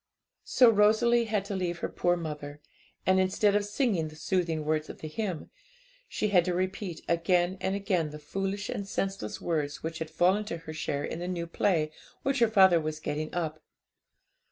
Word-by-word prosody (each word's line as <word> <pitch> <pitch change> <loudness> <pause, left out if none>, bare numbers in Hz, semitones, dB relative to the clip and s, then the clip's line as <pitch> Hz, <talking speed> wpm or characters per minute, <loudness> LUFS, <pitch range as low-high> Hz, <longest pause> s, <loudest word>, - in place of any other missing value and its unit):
So 250 - +5
Rosalie 225 +3 +4
had 210 -3 -1
to 200 -1 -4
leave 175 -2 -2
her - - -2
poor 175 0 +1
mother; 150 -3 -6 0.5
and 190 0 +4
instead 200 +2 +2
of 205 - +3
singing 205 - 0
the 155 - -11
soothing 165 -1 -1
words 155 0 0
of - - -9
the 155 - -5
hymn, 180 +1 -4 0.6
she 210 - -1
had 180 -4 +5
to 180 -1 0
repeat 185 -2 -3
again 175 +2 +2
and 190 +1 0
again 190 -6 0
the 150 - -8
foolish 195 +6 -3
and 200 - -4
senseless 195 - -3
words 150 -4 -2
which 160 0 -4
had 160 -1 -4
fallen 185 +6 +2
to 170 - -4
her 160 -1 -9
share 145 -2 -2
in - - -4
the 175 - -4
new 175 -2 -2
play 165 -2 +1 0.3
which 275 -1 +1
her 235 - +5
father 190 -6 +6
was 155 0 -4
getting 155 0 -3
up. 160 -3 -2
175 Hz, 190 wpm, -29 LUFS, 155-200 Hz, 0.6 s, father